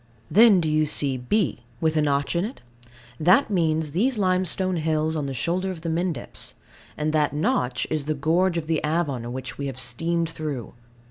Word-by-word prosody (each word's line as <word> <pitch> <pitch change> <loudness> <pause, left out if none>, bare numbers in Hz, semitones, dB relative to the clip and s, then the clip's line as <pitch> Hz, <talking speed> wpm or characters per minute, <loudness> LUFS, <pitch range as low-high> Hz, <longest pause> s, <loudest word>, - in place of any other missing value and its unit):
Then 215 -2 +7
do 165 - 0
you 155 0 +2
see 140 -2 +1
B. 130 - 0 0.2
With 160 0 +1
a 155 - +3
notch 140 +1 0
in 170 - +1
it? 230 +6 -6 0.6
That 180 - +4
means 160 -4 +1
these 230 - +1
limestone 185 -1 +1
hills 155 0 0
on 150 -3 -2
the 135 - -4
shoulder 180 +8 -1
of 180 -4 -6
the 165 - -3
Mendips; 165 -5 -3 0.4
and 155 +1 -1
that 150 -1 +2
notch 125 -4 0
is 155 -3 -1
the 155 0 -1
gorge 170 +5 +1
of 165 - -2
the 160 -1 0
Avon 145 -7 -1
which 130 0 -6
we 140 - -2
have 130 -2 -5
steamed 170 +2 0
through. 150 -7 -5
160 Hz, 190 wpm, -24 LUFS, 145-175 Hz, 0.6 s, Then